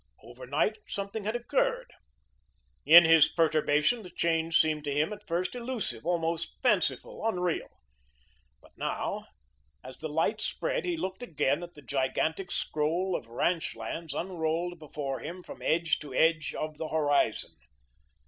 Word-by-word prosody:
Overnight 130 - -2
something 200 +1 -4
had 215 +2 -1
occurred. - - 0 0.9
In 170 +2 +10
his 160 -1 +7
perturbation 155 +6 +2
the 185 - -10
change 165 -1 +1
seemed 155 -2 +2
to 145 - -1
him, 150 +8 +1
at 210 0 -12
first, 175 +1 -1
elusive, 235 - -4
almost 170 -1 -1
fanciful, 185 - +1
unreal. 180 -6 0 1.0
But - - -19
now - - -3 0.6
as 130 0 -10
the 155 - -5
light 165 +8 0
spread, - - -2
he 350 -2 -1
looked 190 -5 -4
again 150 - 0
at 175 0 -9
the 145 - -13
gigantic 150 +7 -1
scroll 170 +5 0
of - - -5
ranch 165 +8 0
lands 165 -1 -5
unrolled 170 0 -2
before 145 -3 -4
him 175 +4 -7
from - - -11
edge 165 0 +1
to 145 -4 -8
edge 160 +1 +2
of 155 -1 -4
the 160 - -3
horizon. 145 -2 +1
165 Hz, 145 wpm, -29 LUFS, 150-190 Hz, 1.0 s, In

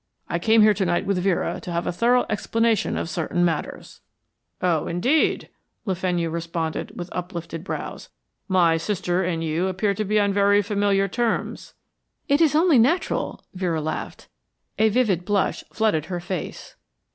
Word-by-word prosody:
I 170 - -1
came 220 +4 +5
here 215 0 +6
to 200 0 -1
night 175 -1 0
with 195 -2 0
Vera 180 -2 0
to 175 - -6
have 170 0 -1
a - - 0
thorough 240 +7 +2
explanation 225 +1 0
of - - -2
certain 175 +1 0
matters." 165 -3 -4 0.6
"Oh, 175 -4 +1
indeed," 250 - +1 0.4
Le 195 - 0
Fenu 175 -2 -1
responded 165 -1 -3
with 175 - -5
uplifted 170 -2 -5
brows. - - -6 0.4
"My 175 -4 +3
sister 180 0 -1
and 170 -2 -2
you 165 +3 0
appear 190 +2 0
to 215 - -2
be 210 +1 +1
on 200 -1 +2
very 205 +1 +4
familiar 200 -1 +1
terms 235 +4 -2 0.3
" - - -52
"It 285 +1 +3
is 305 -3 +4
only 320 -4 +5
natural," 290 +11 0
Vera 180 -4 -1
laughed. 155 +1 -5 0.5
A 220 0 +5
vivid 210 -6 +1
blush 200 +1 0
flooded 210 -9 +1
her 180 0 -4
face. 175 -1 -6
185 Hz, 165 wpm, -23 LUFS, 170-215 Hz, 0.6 s, here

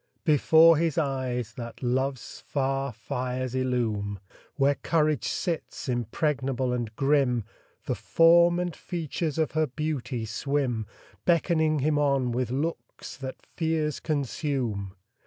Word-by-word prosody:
Before 160 +1 +6
his 165 -1 0
eyes 130 -6 -1
that 120 0 -7
love's 130 +1 -2
far 135 -1 -1
fires 125 +3 -3
illume 115 -6 -1 0.4
Where 140 -1 +3
courage 155 -4 +1
sits, 170 -5 -3
impregnable 130 +1 -1
and 120 -3 -2
grim 135 -4 +2 0.4
The - - 0
form 170 +1 +5
and 175 -1 -2
features 165 -3 -3
of 160 -2 +1
her 155 0 +1
beauty 135 -4 -3
swim, 120 -1 -1 0.4
Beckoning 160 -3 +2
him 150 +1 +2
on 140 -4 +2
with 125 0 -1
looks 145 +7 -4
that 130 -1 -7
fears 160 -3 -1
consume. 130 - -2
135 Hz, 120 wpm, -27 LUFS, 125-155 Hz, 0.4 s, Before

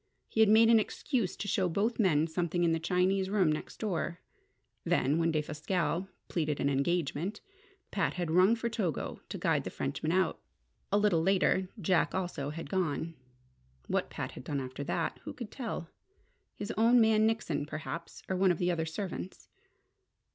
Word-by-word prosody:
He - - -4
had 220 -2 +7
made 225 +1 +7
an 230 -1 +7
excuse 225 -1 -1
to 205 - -4
show 185 -2 +1
both 215 +8 0
men 160 -7 +4
something 170 +1 -1
in 170 - +3
the 165 - +1
Chinese 185 +3 +1
room 190 -6 +3
next 155 - -4
door. 175 -4 -2 0.6
Then, 145 +5 +2
when 165 0 +2
Defasquelle 160 +4 -1 0.2
pleaded 155 -4 -1
an 140 - +2
engagement, 170 +6 -1 0.5
Pat 195 - 0
had 175 -3 -2
rung 185 +6 +5
for 235 0 -2
Togo 210 - -2
to - - -4
guide - - +1
the - - -4
Frenchman 155 - -2
out. 185 -1 +1 0.5
A 200 - +4
little 205 -6 +3
later 190 +1 +2
Jack 180 -2 +2
also 175 -7 -2
had 165 +1 -6
gone. 165 -1 -1 0.7
What - - -1
Pat - - -5
had - - -10
done 145 +1 -2
after 130 +1 -5
that, - - -2
who - - -6
could 235 -4 -8
tell? 225 -9 -4 0.7
His 205 - -4
own 235 +3 +5
man 220 -1 +5
Nickson, 165 -10 -1
perhaps, 155 +2 -6
or 190 - -1
one 185 0 +4
of 175 - 0
the 180 +1 +1
other 160 -2 -1
servants. 160 - -6
180 Hz, 175 wpm, -31 LUFS, 160-205 Hz, 0.7 s, had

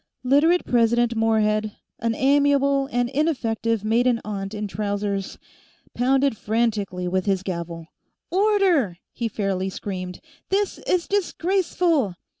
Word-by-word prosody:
Literate 295 +7 +3
President 235 0 +2
Morehead, 215 -1 +1 0.3
an 230 0 -1
amiable 280 0 +3
and 245 0 +1
ineffective 230 -7 0
maiden 235 +2 +2
aunt 200 0 -4
in 210 0 -3
trousers, 200 0 -3 0.6
pounded 265 +1 +2
frantically 210 -5 -1
with 185 +2 -1
his 190 -2 +1
gavel. 170 -3 -5 0.5
"Order!" 370 - +2 0.2
he 235 - -2
fairly 195 -3 -2
screamed. 185 -1 -6 0.3
"This 400 +1 0
is 360 -2 +1
disgraceful!" 350 - 0
230 Hz, 110 wpm, -23 LUFS, 200-280 Hz, 0.6 s, Literate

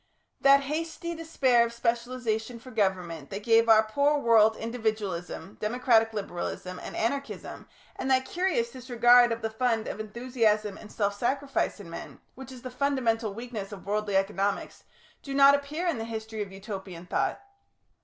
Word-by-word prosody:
That 275 0 +6
hasty 325 +4 -4
despair 275 -7 +2
of 235 - -2
specialisation 235 -1 -2
for 255 +2 -12
government 180 - -1
that 200 +1 -6
gave 230 0 +4
our 220 -1 +7
poor 285 +7 +2
world 220 -4 +5
individualism, 215 -5 -4
democratic 225 0 +3
liberalism, 185 -3 -5
and - - -8
anarchism, 275 +5 -3 0.3
and 265 - -3
that 260 0 +3
curious 320 -9 0
disregard 245 -1 +5
of 230 0 -3
the 220 - -1
fund 225 -1 0
of - - -5
enthusiasm 215 -2 0
and 210 - -12
self 200 -1 -1
sacrifice 275 +3 -1
in 200 - -10
men, 165 - -9
which 265 0 -10
is 255 -2 -11
the 255 - -6
fundamental 245 -6 0
weakness 225 -4 -6
of 200 -2 -9
worldly 205 0 -1
economics, 195 +1 -1 0.4
do 275 -1 -6
not 280 0 +8
appear 285 +5 -2
in 330 -9 0
the 225 - -3
history 220 -1 -5
of 200 -2 -5
Utopian 190 -3 -8
thought. - - -1
230 Hz, 160 wpm, -28 LUFS, 210-255 Hz, 0.4 s, not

